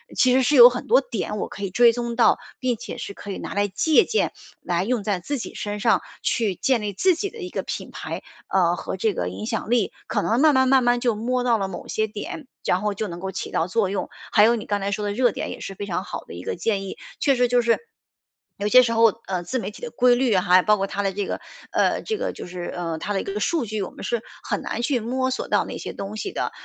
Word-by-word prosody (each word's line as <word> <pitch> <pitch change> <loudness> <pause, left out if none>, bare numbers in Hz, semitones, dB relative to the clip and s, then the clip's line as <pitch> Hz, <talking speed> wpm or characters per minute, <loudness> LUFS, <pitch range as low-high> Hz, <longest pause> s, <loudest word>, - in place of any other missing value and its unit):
其 255 -1 +4
实 260 - +4
是 260 +4 +2
有 240 -2 +11
很 250 0 -5
多 - - +6
点 210 - -4
我 - - -2
可 200 - -10
以 195 - -1
追 235 +5 +5
踪 235 0 -3
到， 235 - +4 0.2
并 255 -2 0
且 - - -8
是 200 - -6
可 205 - -10
以 - - -4
拿 - - -6
来 205 0 +1
借 310 - +3
鉴， 440 - 0 0.3
来 175 0 0
用 230 0 -1
在 195 -2 0
自 280 +11 -3
己 - - -6
身 205 0 -4
上， 210 -3 +3 0.2
去 215 -5 +1
建 255 +4 +1
立 205 -1 -3
自 370 - +3
己 390 +4 -3
的 465 - -13
一 365 - -6
个 - - -2
品 - - -6
牌， - - -6 0.2
呃， 175 -2 +2
和 190 - -5
这 215 +2 +1
个 90 - -2
影 95 +3 -6
响 115 - -3
力， 235 -4 +2 0.2
可 - - 0
能 230 +3 +1
慢 305 -2 +5
慢 260 0 +4
慢 265 0 +5
慢 240 0 +3
就 240 -2 +1
摸 245 +4 -1
到 240 -2 +3
了 195 - -1
某 190 - -8
些 220 0 0
点， 295 - -7 0.2
然 180 - +2
后 210 -1 0
就 210 +2 -3
能 170 -2 -7
够 190 +1 -4
起 190 - -5
到 165 - 0
作 200 +1 +1
用。 195 0 -3 0.2
还 210 - +6
有 230 +2 +5
你 220 - -5
刚 205 -1 -1
才 200 0 -2
说 210 +1 -2
的 205 - -1
热 245 +1 +3
点 - - -4
也 - - -7
是 195 - -6
非 205 - -5
常 180 -4 -2
好 - - -6
的 - - -11
一 85 +1 -8
个 - - -3
建 195 +3 -1
议， 195 - -7 0.2
确 275 -2 +3
实 250 0 +3
就 245 0 +3
是 230 -1 +3 0.8
有 200 - -1
些 255 +4 +8
时 230 -1 0
候， 230 0 +6 0.2
呃， 185 -2 -2
自 255 +9 -2
媒 220 - -4
体 - - -14
的 480 - -5
规 250 -1 +4
律， 245 -4 +2
还 180 0 +5
包 210 +2 +3
括 195 0 -1
它 205 - -2
的 195 - +1
这 200 +1 -2
个 - - -3 0.3
呃， - - +2
这 440 - -2
个 - - -2
就 - - -8
是 175 0 -6
呃， 165 -2 -3
它 205 - -3
的 195 - 0
一 - - -6
个 200 +1 -3
数 320 +3 +1
据 215 -1 -3
我 190 - -3
们 - - -11
是 235 -2 -1 0.2
很 - - -2
难 - - -3
去 245 0 +1
摸 260 +3 -1
索 260 - -3
到 - - +2
那 - - -6
些 - - -6
东 200 +2 -6
西 390 - -4
的， - - -2
215 Hz, 305 characters per minute, -23 LUFS, 195-250 Hz, 0.8 s, 有